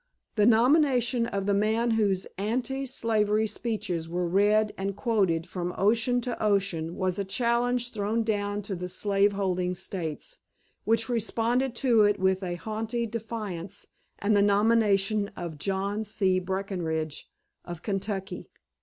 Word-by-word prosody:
The 210 -1 +3
nomination 245 0 +3
of 195 -3 -3
the 200 - +2
man 220 +4 +1
whose 200 -4 +1
anti 250 +6 -2
slavery 220 -3 +1
speeches 210 -7 -3
were 175 +1 -1
read 210 +4 +3
and 195 0 -3
quoted 195 -9 +1
from 180 -1 -4
ocean 230 +4 +2
to 240 0 -4
ocean 190 -5 0
was 185 0 -1
a - - +1
challenge 240 +3 0
thrown 215 +2 -1
down 205 -1 -1
to 195 -1 -4
the 180 +1 -5
slave 200 +2 +2
holding 180 -2 -1
States, 185 - -4 0.5
which 225 0 +2
responded 235 +2 0
to 235 -3 +3
it 205 0 +4
with 190 0 +2
haughty 215 +6 -3
defiance 215 -5 -5 0.3
and 205 +1 +1
the 200 - +5
nomination 205 0 +3
of 165 -4 -6
John 195 +4 -1
C. 195 -3 +1
Breckinridge, 180 -5 -3 0.3
of 175 -1 -8
Kentucky. 195 -2 -4
205 Hz, 135 wpm, -27 LUFS, 190-230 Hz, 0.5 s, the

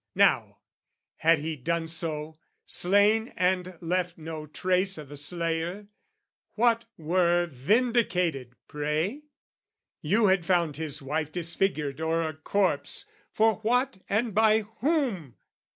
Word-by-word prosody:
Now, - - +3 0.6
had 165 +1 +4
he 155 +2 -4
done 165 +4 -2
so, 160 -1 -4 0.3
slain 205 +4 +3
and 180 -1 0
left 180 0 -1
no 160 -1 -7
trace 185 +4 0
O' 155 - -6
the 145 +2 -11
slayer, 170 +5 -2 0.7
what 230 0 +2
were 175 +2 +2
vindicated, 175 - 0
pray? 155 - -2 0.8
You 220 +1 +2
had 190 -3 +3
found 170 -4 +1
his 150 -3 -4
wife 150 +2 -2
disfigured 165 -4 -1
or 165 +1 +1
a 160 -1 -3
corpse, 190 +5 0 0.3
For 220 0 +3
what 245 +1 0
and 220 +2 0
by 220 +1 +4
whom? 225 - -2
175 Hz, 120 wpm, -27 LUFS, 155-205 Hz, 0.8 s, had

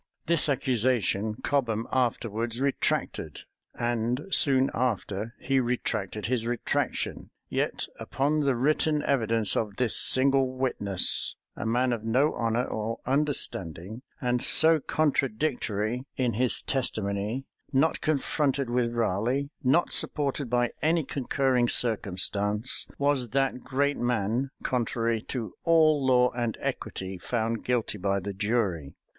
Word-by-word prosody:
This 165 -2 +2
accusation 115 -6 +1
Cobham 115 -6 0
afterwards 115 -2 -1
retracted; 140 0 -1 0.3
and, 120 +2 -1
soon 135 -5 +4
after, 115 -2 -2
he 135 0 +1
retracted 110 -5 -2
his 115 -1 -1
retractation. 120 -1 -2 0.2
Yet - - -1
upon 145 +3 0
the 140 -3 +1
written 150 +3 +1
evidence 115 -7 +2
of 105 -3 -2
this 125 -3 +2
single 130 -1 +3
witness, 100 -8 +2 0.2
a - - -4
man 125 +2 +1
of 115 -2 -4
no 130 +7 +2
honor 115 +1 0
or 110 -1 -3
understanding, 110 - -1 0.2
and 125 -1 0
so 160 0 +6
contradictory 130 -5 -1
in 125 -3 0
his 125 +3 +2
testimony; 110 -1 -2 0.3
not 145 +4 +2
confronted 140 -3 0
with 120 -1 0
Raleigh; 120 +6 0
not 135 +7 +2
supported 140 -3 +1
by 120 0 +1
any 160 +2 +2
concurring 130 -2 0
circumstance; 105 0 0
was 140 -4 +1
that 135 -2 +1
great 140 +3 -1
man, 120 +2 -1
contrary 115 -2 -1
to 120 -4 -4
all 155 -3 +4
law 125 -1 +4
and 120 -2 -3
equity, 95 -1 -5
found 115 +4 -2
guilty 120 -4 -1
by 100 +1 0
the 100 +1 -5
jury. 100 - -1
120 Hz, 120 wpm, -27 LUFS, 110-135 Hz, 0.3 s, so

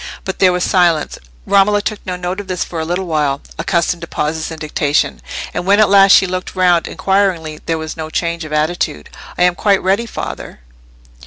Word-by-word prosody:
But 190 - -4
there 185 -1 +5
was 180 0 -1
silence. 170 -5 +1 0.3
Romola 205 +1 +3
took 210 0 -4
no 180 - -2
note 180 +2 -4
of 205 - -7
this 185 -1 -2
for 170 - -6
a 160 - -2
little 175 +3 -2
while, 150 -4 0 0.2
accustomed 170 +1 0
to 170 - -6
pauses 155 +1 -2
in 160 - -7
dictation; 150 -1 -1 0.3
and 175 - -2
when 200 +3 +3
at 215 - +5
last 195 -1 +7
she - - +6
looked 185 +1 -4
round 180 -2 +3
inquiringly, 185 -6 0
there 165 - 0
was 160 0 -6
no 160 -1 -6
change 170 +1 -2
of 155 - -8
attitude. 150 - -1 0.3
"I - - +2
am 180 0 +4
quite 200 +1 +1
ready, 200 +5 +1
father!" 135 - -7
175 Hz, 200 wpm, -16 LUFS, 160-190 Hz, 0.3 s, last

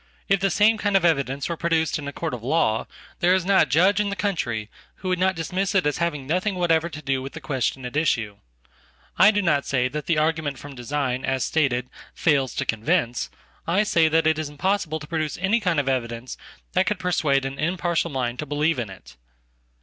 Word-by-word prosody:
If 195 -1 +3
the 195 +1 +1
same 210 +4 +3
kind 205 -2 +2
of 185 - +1
evidence 140 -4 +1
were 170 - -2
produced 165 -1 0
in 145 - -6
a - - -3
courtof 145 -7 -4
law, 125 -4 +1 0.3
there 180 +1 +4
is 185 -2 0
not 190 -5 +4
a - - -22
judge 185 +8 +4
in 205 -1 +1
the 200 - -3
country 125 - -2 0.3
who 185 - -5
would 180 -1 0
not 190 0 +2
dismissit 185 +3 0
as 150 - 0
having 160 -5 -1
nothing 185 +7 0
whatever 170 -2 +2
to 155 -1 -9
do 135 -1 0
with 135 +1 -7
the 160 - -7
question 130 -3 -2
at 125 - -6
issue. 115 -10 0 0.9
Ido 205 0 +6
not 150 -7 +1
say 125 -2 +1
that 150 +3 -5
the 170 - +2
argument 155 -2 0
from 145 +1 -10
design, 130 0 -2
as 130 -1 0
stated, 130 -6 0 0.3
fails 140 -6 +1
toconvince; 120 +2 0 0.4
I 185 +5 +3
say 170 -6 +3
that 160 +1 +2
it 160 0 +2
is 155 -2 -3
impossible 160 +1 -1
to 150 - -9
produce 155 -2 -2
any 195 +6 +2
kind 180 -6 0
ofevidence 125 -3 -2 0.4
that 185 0 +2
could 210 - 0
persuade 155 -7 +1
an 135 +1 -5
impartial 170 0 0
mind 125 -4 -2
to 150 - -4
believe 150 0 +1
in 115 -4 -3
it. 95 -9 -13
155 Hz, 205 wpm, -24 LUFS, 135-180 Hz, 0.9 s, Ido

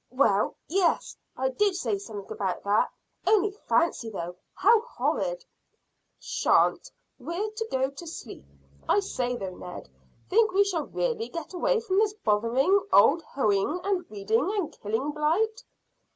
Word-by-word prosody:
"Well, 225 -6 +2
yes, 360 +1 +1 0.2
I 265 +1 +1
did 400 +7 +1
say 225 - -1
something 200 -1 -8
about 190 -3 -2
that. 205 +1 +2 0.4
Only 415 -1 +4
fancy, 335 - 0
though, 175 -4 -5 0.2
how 440 +2 +5
horrid!" - - -2 0.7
"Shan't! - - +2 0.3
We're 340 +11 -3
to 445 +1 -4
go 265 +1 0
to 305 +5 -10
sleep. 260 -8 -8 0.5
I - - +5
say, 250 -11 -2
though, 195 -5 -5
Ned; 180 - -9 0.4
think 435 0 +3
we 400 +1 +5
shall 360 -6 -2
really 470 -2 -2
get 335 +1 -7
away 475 +6 +1
from 395 -4 +1
this 420 -1 +2
bothering 260 - +2
old 285 +11 +6
hoeing 265 - 0
and 385 -2 0
weeding 215 - 0
and 370 -7 -1
killing 225 +7 -1
blight?" 390 +11 0
325 Hz, 145 wpm, -27 LUFS, -, 0.7 s, old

